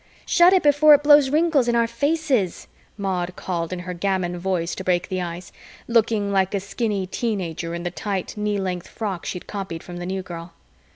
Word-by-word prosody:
"Shut 350 +1 +5
it 375 -1 +4
before 295 +1 +7
it 290 - -1
blows 290 -2 +6
wrinkles 300 -3 +2
in 240 - +2
our 235 0 +3
faces," 260 - 0 0.3
Maud 185 -3 -2
called 170 -2 -3
in 185 - -3
her 180 +1 -5
gamin 180 -1 -1
voice 175 -2 -1
to 190 - -6
break 180 -1 0
the 185 -1 -2
ice, 175 0 -6 0.4
looking 220 -3 +2
like 190 0 +1
a - - +1
skinny 200 0 -2
teen 215 +2 -2
ager 170 -1 -4
in 170 - -5
the 175 - -3
tight, 195 0 -4
knee 210 -1 -1
length 180 -2 -3
frock 200 -6 -5
she'd 180 - -5
copied 190 -5 -6
from 175 -1 -8
the 175 0 -5
New 190 0 -3
Girl. 170 -1 -8
190 Hz, 205 wpm, -23 LUFS, 175-235 Hz, 0.4 s, before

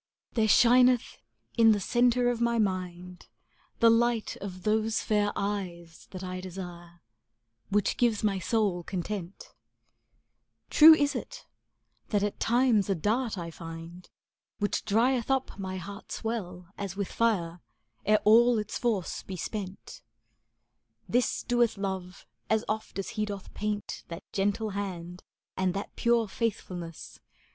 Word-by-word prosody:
There 220 -2 +2
shineth 245 +2 +5 0.4
in 225 -1 +7
the 205 - 0
centre 245 +4 +2
of 240 -1 -4
my 235 0 +2
mind 180 -3 -3 0.5
The 230 0 +7
light 235 -1 +1
of 185 -2 -8
those 220 +1 +1
fair 205 -1 +1
eyes 180 -5 -4
that 185 -1 -8
I 185 0 -5
desire, 175 -2 -8
^ 175 - -26 0.7
Which 205 0 +1
gives 230 -4 +2
my 200 -2 +1
soul 200 -3 0
content; 185 +1 -6 1.2
True 315 +1 +10
is 285 -2 +1
it - - -7 0.6
that 205 -2 +1
at 205 - -2
times 235 -4 +3
a 195 - +2
dart 220 +5 0
I 170 -1 -5
find 165 +2 -9 0.5
Which 205 - -1
drieth 235 +4 +2
up 265 -5 -1
my 190 -1 -4
heart's 200 +5 -8
well 180 -6 -4
as 195 -2 -4
with 200 -1 -3
fire, 180 -7 0 0.4
Ere 215 +1 +3
all 235 +2 +6
its 210 -1 -3
force 220 -7 -1
be 190 - -7
spent; 195 +1 -6 1.1
This 245 +1 +1
doeth 240 -3 +2
Love 190 -2 -5 0.2
as 220 0 +2
oft 215 -1 -3
as 195 - -3
he 215 -2 -2
doth 200 -2 -7
paint 210 0 -3
^° - - -43
That 170 +3 -8
gentle 205 +2 0
hand 180 -3 -5 0.3
and 185 -1 0
that 200 - -5
pure 235 -1 +2
faithfulness. 180 -6 -5
205 Hz, 140 wpm, -28 LUFS, 185-230 Hz, 1.2 s, True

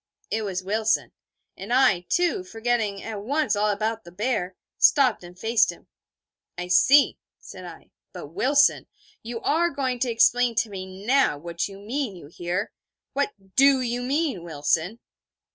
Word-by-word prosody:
It 220 - 0
was 190 -3 -3
Wilson. 220 +3 0 0.4
And 200 +4 -8
I, 230 -9 +3
too, 355 +2 +1
forgetting 225 - -2
at 215 -3 -6
once 275 0 0
all 210 +1 +1
about 220 +2 -2
the 175 - -13
bear, 195 -2 -2 0.2
stopped 260 - +4
and 175 +1 -12
faced 225 0 +2
him. 175 - -16 0.7
'I 180 0 -5
see,' 275 +10 +5 0.2
said 185 -1 -11
I. 170 -2 -12 0.2
'But, 145 - -9
Wilson, 280 - +2 0.3
you 230 0 -6
are 335 +3 +2
going 260 -4 -2
to 250 - 0
explain 240 +1 +3
to 220 0 0
me 190 0 -8
now 265 - +3
what 170 +2 -4
you 195 -1 -11
mean, 225 +2 -4
you 170 - -12
hear? 175 +6 -4 0.4
What 280 0 -1 0.2
do 275 0 +5
you 245 -1 -2
mean, 275 - -1
Wilson?' 165 +5 -1
220 Hz, 160 wpm, -24 LUFS, 185-260 Hz, 0.7 s, see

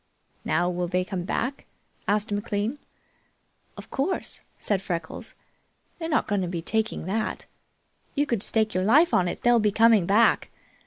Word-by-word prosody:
"Now, 175 - +1
will 180 0 -1
they 180 +1 0
come 185 -2 -4
back?" 255 +7 -3 0.4
asked 210 +1 +1
McLean. 205 +5 -2 1.0
"Of - - -11
course!" 285 +8 -2 0.2
said 200 -3 -1
Freckles. 170 -4 -5 0.6
"They're 325 -1 -4
not 305 - +1
going 205 -2 0
to 180 - -2
be 170 -1 -4
taking 220 -1 -1
that. 215 +4 -2 0.7
You 290 - +2
could 235 -8 -1
stake 220 0 +1
your 185 - 0
life 300 - +5
on 180 - +3
it, - - -5
they'll 240 -1 +5
be 210 -1 +2
coming 220 -4 +4
back. 215 +4 +3
210 Hz, 160 wpm, -26 LUFS, 185-230 Hz, 1.0 s, life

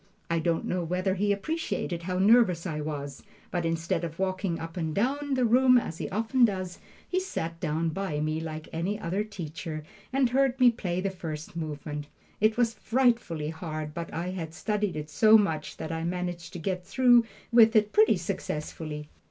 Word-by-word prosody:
I 165 - +2
don't 165 0 0
know 180 -1 -1
whether 180 +3 0
he 205 +2 +1
appreciated 200 - -2
how 180 +1 -2
nervous 195 -4 +5
I 155 -4 -3
was, 145 -2 -5 0.3
but 175 -2 0
instead 165 +1 -1
of 165 -1 -4
walking 185 -2 -1
up 165 0 -7
and 160 -3 -2
down 275 +6 0
the 255 -1 +2
room, 250 +2 +6
as 170 -8 -2
he - - -3
often 225 +5 +1
does, 185 -5 +1 0.3
he 370 - +1
sat 165 - -4
down 160 +2 0
by 160 -3 -2
me 155 +1 -1
like 155 -1 -6
any 185 +6 -1
other 190 +2 -1
teacher, 165 -5 -6 0.3
and 260 -2 +2
heard 265 0 +2
me 250 -1 +7
play 185 -6 -2
the 195 0 -1
first 160 -4 -6
movement. 150 -2 -5 0.3
It 215 +1 +3
was 235 -2 +2
frightfully 230 -10 +1
hard, 155 -2 -5
but 170 +1 -5
I 170 +2 -3
had 165 -3 -5
studied 210 -2 -1
it 150 0 -5
so 215 +9 +7
much 160 -8 -1
that 160 - -5
I 165 0 -3
managed 175 -1 -3
to - - -5
get 180 +1 -2
through 245 +2 +5 0.3
with 230 -1 +7
it 210 -1 +3
pretty 215 0 +5
successfully. 150 -2 -4
180 Hz, 185 wpm, -28 LUFS, 160-220 Hz, 0.3 s, me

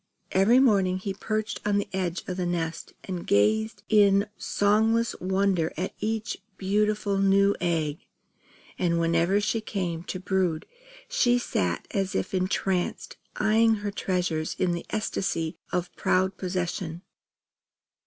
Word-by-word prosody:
Every 200 +6 +5
morning 200 -8 +4
he 195 +1 -4
perched 215 +2 -3
on 205 -1 +1
the 205 - -1
edge 185 -2 -2
of 185 - -3
the 180 - -1
nest 165 -2 -3
and 180 -3 -5
gazed 110 - +2
in 200 -2 +4
songless 220 +3 +2
wonder 190 -3 +1
at 185 +3 -3
each 220 +1 -2 0.2
beautiful 205 0 +1
new 195 +1 +4
egg; 160 -4 0 0.8
and 170 -2 +1
whenever 170 +4 +2
she 220 +2 0
came 180 -6 -3
to 185 - -4
brood 185 -4 0 0.4
she 245 - +3
sat 90 - -1
as 195 -1 -1
if - - -2
entranced, 185 -1 -1 0.2
eyeing 225 +1 +3
her 205 - -1
treasures 180 -5 -1
in 180 -2 +1
an 170 - -4
ecstasy 190 -6 -2
of 180 0 -2
proud 190 +1 +1
possession. 180 -1 -3
190 Hz, 135 wpm, -26 LUFS, 175-205 Hz, 0.8 s, Every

